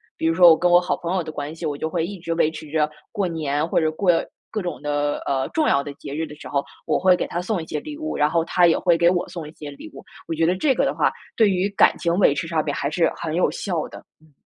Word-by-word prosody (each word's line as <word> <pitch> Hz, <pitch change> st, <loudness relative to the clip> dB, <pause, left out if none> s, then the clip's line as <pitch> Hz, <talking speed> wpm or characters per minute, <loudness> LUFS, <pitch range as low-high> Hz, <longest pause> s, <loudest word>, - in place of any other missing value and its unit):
比 160 Hz, -, -1 dB
如 165 Hz, -, +2 dB
说 175 Hz, -1 st, +8 dB
我 160 Hz, -, +5 dB
跟 180 Hz, 0 st, +2 dB
我 175 Hz, -, +7 dB
好 180 Hz, -, -1 dB
朋 170 Hz, +1 st, -4 dB
友 180 Hz, -, 0 dB
的 155 Hz, -, -6 dB
关 145 Hz, +1 st, -5 dB
系， 165 Hz, -, -6 dB
我 150 Hz, -2 st, -2 dB
就 160 Hz, +2 st, -3 dB
会 165 Hz, 0 st, -1 dB
一 195 Hz, 0 st, -7 dB
直 165 Hz, -1 st, -3 dB
维 160 Hz, -2 st, +2 dB
持 155 Hz, -1 st, -9 dB
着 155 Hz, -1 st, +2 dB, 0.2 s
过 200 Hz, -4 st, -1 dB
年 155 Hz, -2 st, -1 dB
或 170 Hz, -, +1 dB
者 155 Hz, 0 st, +1 dB
过 180 Hz, +3 st, +2 dB, 0.4 s
各 215 Hz, -, -3 dB
种 175 Hz, -, -5 dB
的， 145 Hz, 0 st, -1 dB
呃， 135 Hz, -1 st, 0 dB
重 315 Hz, -2 st, +1 dB
要 140 Hz, 0 st, +3 dB
的 145 Hz, -, -7 dB
节 140 Hz, -, -8 dB
日 160 Hz, +1 st, -2 dB
的 150 Hz, -, -11 dB
时 -, -, -11 dB
候， 140 Hz, -1 st, -1 dB, 0.2 s
我 -, -, +1 dB
会 185 Hz, 0 st, +5 dB
给 -, -, -2 dB
他 175 Hz, -, -3 dB
送 190 Hz, -2 st, -2 dB
一 -, -, -7 dB
些 155 Hz, -, -3 dB
礼 300 Hz, -1 st, -8 dB
物， 310 Hz, 0 st, -4 dB
然 150 Hz, 0 st, +2 dB
后 170 Hz, 0 st, +2 dB
他 180 Hz, -, +3 dB
也 165 Hz, -, +3 dB
会 170 Hz, -2 st, +3 dB
给 170 Hz, +1 st, +4 dB
我 180 Hz, -1 st, 0 dB
送 175 Hz, -3 st, -7 dB
一 -, -, -10 dB
些 150 Hz, -2 st, -9 dB
礼 140 Hz, -, -11 dB
物。 -, -, -10 dB, 0.3 s
我 -, -, -1 dB
觉 165 Hz, +1 st, +1 dB
得 180 Hz, +2 st, +2 dB
这 265 Hz, +8 st, +2 dB
个 -, -, +1 dB
的 -, -, -1 dB
话 -, -, +2 dB, 0.2 s
对 220 Hz, -3 st, +4 dB
于 185 Hz, +1 st, +1 dB
感 -, -, +5 dB
情 170 Hz, -1 st, 0 dB
维 145 Hz, -, +5 dB
持 165 Hz, -, -3 dB
上 160 Hz, -2 st, 0 dB
边 145 Hz, -, -2 dB
还 140 Hz, -, -1 dB
是 165 Hz, +2 st, +1 dB
很 160 Hz, -1 st, -3 dB
有 180 Hz, -, +2 dB
效 175 Hz, -6 st, -3 dB
的。 -, -, -10 dB, 0.2 s
嗯。 155 Hz, -1 st, -24 dB
165 Hz, 330 characters per minute, -22 LUFS, 150-180 Hz, 0.4 s, 说